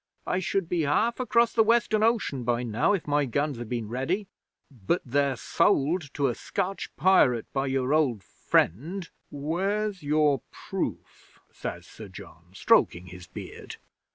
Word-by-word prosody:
"I 180 - 0
should 190 0 -1
be 175 -1 0
half 215 - +1
across 235 -2 +2
the 225 - +4
Western 220 -1 +3
Ocean 220 - +1
by 120 0 0
now 115 - +1
if 195 - -1
my 145 -1 +1
guns 140 +1 -1
had 120 -2 -6
been 120 -3 -3
ready. 155 - -2 0.4
But 130 - -1
they're 140 +1 +1
sold 165 -3 +1
to 140 - +1
a 125 - +2
Scotch 195 - -3
pirate 130 - +4
by 135 0 0
your 135 +1 0
old 130 -10 +1
friend 165 - 0
" - - -47
'"Where's 195 +7 -2
your 145 -3 +2
proof?" - - -6
says - - -6
Sir - - -11
John, 85 +1 -13
stroking 90 -2 +3
his 90 0 -11
beard. 90 - -9
145 Hz, 155 wpm, -27 LUFS, 125-190 Hz, 0.4 s, the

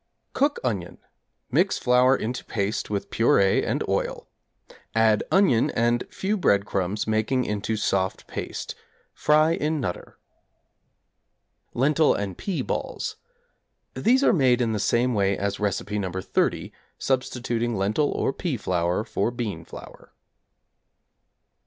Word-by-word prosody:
Cook 285 +2 +1
onion; 100 -9 -3 0.5
mix - - +2
flour 125 +2 +4
into 120 +3 -4
paste 105 -1 -2
with 100 -1 -3
purée 100 -4 +3
and - - -1
oil; - - -2 0.7
add 110 -1 +4
onion 170 - +4
and 120 +1 0
few 205 +3 -2
breadcrumbs 100 - +1
making 110 +4 0
into 105 +1 -2
soft 95 -2 -1
paste. - - -5 0.4
Fry 155 +1 +3
in 155 -1 0
'Nutter.' 90 -10 -5 1.6
=31. - - -5
Lentil 150 +3 +4
and 100 -3 -3
Pea 190 - -3
Balls= - - -4 0.8
These 255 +4 +2
are - - +5
made 130 -6 +3
in 120 -2 +1
the 110 - -1
same 120 +4 +1
way 100 -2 +1
as 100 0 -2
Recipe 105 0 -1
No. 95 -3 -3
30, 95 -1 -1 0.2
substituting 120 -3 -1
lentil 105 +9 +1
or 135 - -1
pea 155 -5 -2
flour 90 -1 0
for 110 -1 -1
bean 115 -9 -4
flour. - - -12
115 Hz, 125 wpm, -25 LUFS, 100-130 Hz, 1.6 s, are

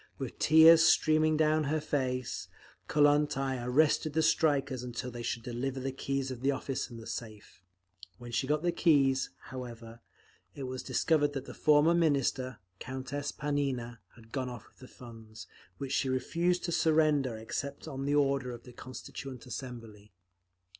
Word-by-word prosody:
With - - -6
tears 160 +1 +8
streaming 155 0 +4
down 155 0 +2
her 155 +3 0
face, 130 -4 -2 0.4
Kollontai 145 -3 +2
arrested 145 +4 +2
the 160 +1 +2
strikers 140 -6 +2
until 125 +1 -5
they 120 0 -7
should 115 0 -3
deliver 130 +3 -3
the 135 +1 -3
keys 135 0 -3
of 125 -2 -7
the 135 - +1
office 135 -1 -2
and 115 -2 -9
the 115 - -10
safe; 110 -4 -8 0.6
when 120 +2 -10
she 130 +3 -1
got 150 +2 0
the 175 - +2
keys, 140 -6 +3 0.2
however, 115 -2 -8 0.6
it 140 - -6
was 130 0 -4
discovered 145 -2 +1
that 135 -1 -5
the - - -9
former 150 +2 +4
Minister, 135 -6 +1 0.2
Countess 135 +2 -4
Panina, 135 -5 -2 0.2
had 115 -1 -18
gone 130 -2 -2
off 120 -3 -8
with - - -27
all 130 - -11
the - - -21
funds, 115 -2 -12 0.3
which 135 -2 -5
she 135 - +1
refused 170 +8 0
to 170 - -2
surrender 155 -7 +2
except 140 +7 -5
on 135 -2 -5
the 145 +1 +1
order 140 -3 +1
of 120 - -10
the 125 - -13
Constituent 130 +1 -9
Assembly. 115 -5 -9
135 Hz, 165 wpm, -31 LUFS, 125-150 Hz, 0.6 s, tears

